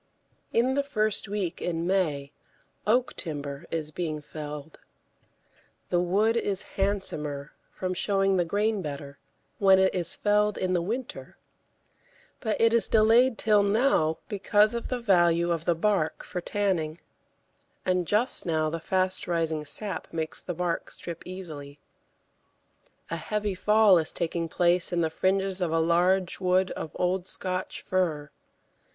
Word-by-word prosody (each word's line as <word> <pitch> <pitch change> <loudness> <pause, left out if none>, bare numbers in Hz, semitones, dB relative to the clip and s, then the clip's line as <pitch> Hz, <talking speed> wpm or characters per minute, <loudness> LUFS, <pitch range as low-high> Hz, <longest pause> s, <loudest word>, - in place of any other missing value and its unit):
In 250 +3 +2
the 280 - +2
first 215 -6 +1
week 195 -4 -3
in 170 -1 -2
May 155 -7 0 0.6
oak 245 +3 +2
timber 145 -1 -4
is 155 -2 -3
being 155 -2 -3
felled. 150 0 -8 1.1
The 175 - +3
wood 200 +6 +2
is 200 -4 -1
handsomer, 150 -8 -2 0.2
from 185 -1 -3
showing 195 +1 +1
the 180 - +3
grain 205 +4 0
better, 140 -3 -7 0.4
when 195 -1 +6
it 190 0 +3
is 175 -3 +1
felled 210 0 +2
in 185 -1 0
the 175 - +2
winter, 235 +8 -5 1.0
but 220 -4 -2
it 230 0 +4
is 235 - +3
delayed 225 +3 +4
till 210 -2 +4
now 200 -6 +2
because 210 +2 +3
of 235 - -3
the 250 - -2
value 175 -5 +3
of 165 -1 -1
the 175 - +2
bark 180 -2 0
for 180 - -5
tanning, 175 -5 -1 0.9
and 180 -2 +1
just 220 +8 +1
now 155 -2 0
the 165 - -3
fast 185 +2 0
rising 160 -3 -1
sap 195 +7 -5
makes 160 -1 -3
the 175 - -5
bark 175 0 -2
strip 170 -1 -7
easily. 155 -6 -8 1.3
A 165 - -1
heavy 210 +4 -2
fall 210 0 +5
is 160 - -2
taking 170 0 -2
place 175 +2 +2
in 175 -1 +1
the 160 -1 0
fringes 190 +2 0
of 175 -3 0
a 165 - +2
large 175 +3 +2
wood 185 0 +2
of - - -5
old 180 0 0
Scotch 185 -1 -4
fir. 160 -6 -1
185 Hz, 145 wpm, -27 LUFS, 165-205 Hz, 1.3 s, when